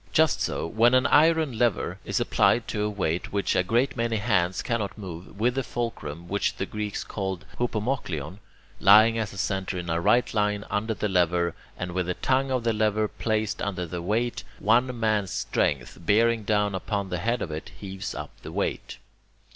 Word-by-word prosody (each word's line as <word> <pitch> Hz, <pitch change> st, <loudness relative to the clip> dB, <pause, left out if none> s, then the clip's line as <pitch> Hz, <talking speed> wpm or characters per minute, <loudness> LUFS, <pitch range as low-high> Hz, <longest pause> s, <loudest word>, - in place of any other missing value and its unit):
Just 160 Hz, -2 st, +3 dB
so, -, -, -1 dB
when 115 Hz, +8 st, +4 dB
an 130 Hz, +1 st, +4 dB
iron 155 Hz, -5 st, +4 dB
lever 120 Hz, -4 st, +1 dB
is -, -, 0 dB
applied 120 Hz, -, +2 dB
to 105 Hz, -, -2 dB
a 105 Hz, -, +1 dB
weight 90 Hz, -5 st, -2 dB
which 100 Hz, 0 st, 0 dB
a -, -, +4 dB
great 120 Hz, +8 st, +1 dB
many 115 Hz, -1 st, 0 dB
hands 95 Hz, -4 st, +1 dB
cannot 110 Hz, -4 st, -2 dB
move, 95 Hz, -1 st, -9 dB
with 120 Hz, +3 st, +2 dB
the 135 Hz, -, 0 dB
fulcrum, 85 Hz, -, -5 dB
which 100 Hz, +3 st, 0 dB
the 95 Hz, -, -2 dB
Greeks 105 Hz, 0 st, -4 dB
call 95 Hz, -2 st, -3 dB
[Greek: 95 Hz, +2 st, -21 dB
hupomochlion], 105 Hz, -, -2 dB, 0.4 s
lying 110 Hz, +3 st, +7 dB
as 110 Hz, -2 st, -2 dB
a 100 Hz, -, -11 dB
centre 95 Hz, -1 st, -2 dB
in 85 Hz, -1 st, -3 dB
a 85 Hz, +1 st, 0 dB
right 120 Hz, +6 st, +3 dB
line 105 Hz, -1 st, 0 dB
under 110 Hz, +2 st, -1 dB
the 105 Hz, -, -1 dB
lever, 90 Hz, -2 st, +2 dB, 0.2 s
and 90 Hz, 0 st, -4 dB
with 90 Hz, 0 st, -1 dB
the 90 Hz, -, -1 dB
tongue 135 Hz, +1 st, +1 dB
of 130 Hz, -2 st, 0 dB
the 115 Hz, -1 st, +1 dB
lever 110 Hz, 0 st, +1 dB
placed 110 Hz, -1 st, -2 dB
under 90 Hz, -3 st, -2 dB
the 85 Hz, +1 st, -5 dB
weight, 115 Hz, +7 st, -1 dB
one 120 Hz, +3 st, +2 dB
man's 105 Hz, -3 st, +1 dB
strength, 70 Hz, -9 st, -1 dB
bearing 115 Hz, +3 st, +3 dB
down 105 Hz, -1 st, +1 dB
upon 100 Hz, +1 st, -2 dB
the 90 Hz, -1 st, -2 dB
head 115 Hz, +6 st, 0 dB
of 80 Hz, -, -5 dB
it, 75 Hz, +1 st, -6 dB
heaves 95 Hz, -1 st, -6 dB
up -, -, -6 dB
the -, -, -8 dB
weight. -, -, -3 dB
105 Hz, 195 wpm, -26 LUFS, 95-115 Hz, 0.4 s, lying